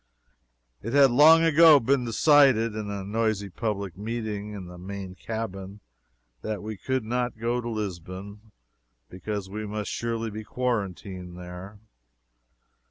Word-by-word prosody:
It 115 - -5
had 140 -2 +6
long 155 +6 +7
ago 165 -2 +7
been 130 +1 +1
decided 125 -2 +4
in 105 -1 -4
a 100 -1 -4
noisy 105 -1 -1
public 100 -3 -3
meeting 105 0 -4
in 100 -3 -7
the 90 0 -11
main 95 0 -7
cabin 100 -1 -6 0.6
that 105 -1 -4
we 110 0 -5
could 130 +5 -2
not 125 +1 -2
go 120 +2 -1
to 120 - -5
Lisbon, 100 0 -6 0.6
because 100 +2 -5
we 105 +2 -6
must 105 0 -4
surely 115 -1 -3
be 110 +1 -6
quarantined 95 -7 -3
there. 90 +3 -9
110 Hz, 135 wpm, -26 LUFS, 100-120 Hz, 0.6 s, long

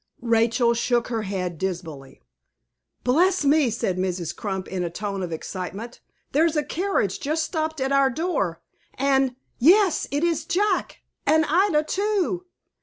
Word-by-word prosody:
Rachel 235 +1 +3
shook 240 0 0
her 230 -2 -1
head 185 -5 -3
dismally. 165 - -5 0.8
"Bless 345 +6 +3
me!" 290 -2 +4
said 190 -5 -2
Mrs. 180 -3 -2
Crump, 190 -3 -4
in 185 -2 -3
a 170 - -2
tone 195 +2 -4
of 180 -2 -4
excitement; 190 +8 -6 0.3
"there's 320 +3 +2
a 300 - +2
carriage 340 - -1
just 310 +3 -1
stopped 315 -1 -2
at 265 +1 -1
our 275 -1 +4
door, 265 - -2 0.3
and 270 -1 +2 0.2
yes, 365 - +4
it 290 +3 -1
is 330 -2 +1
Jack, 380 +3 0 0.3
and 315 0 +4
Ida 340 -2 +3
too!" 375 0 -1
265 Hz, 145 wpm, -24 LUFS, 190-320 Hz, 0.8 s, me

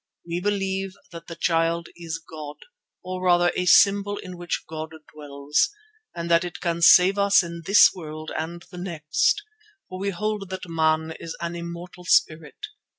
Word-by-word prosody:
We 170 +1 -2
believe 195 -1 -2 0.2
that 165 -1 -10
the 170 - -7
Child 165 0 0
is 165 -2 -5
God, 155 -2 -9 0.5
or 185 0 -5
rather 175 -1 +4
a 180 - -1
symbol 200 +2 +5
in 185 -1 -8
which 175 0 -4
God 160 0 -7 0.2
dwells, 145 - -1 0.5
and 170 0 -4
that 170 +1 +5
it 175 0 -6
can 170 -1 -2
save 185 +3 +7
us 200 -1 +5
in 170 0 -7
this 195 -3 +7
world 155 -3 -8
and 170 +2 -5
the 180 - -8
next, 170 - 0 0.5
for 185 - -7
we 200 +1 -1
hold 210 +1 -3
that 185 -1 -6
man 160 -1 +1
is 165 - -7
an 170 0 -4
immortal 170 +1 -8
spirit. 165 - +1
170 Hz, 165 wpm, -24 LUFS, 165-185 Hz, 0.5 s, save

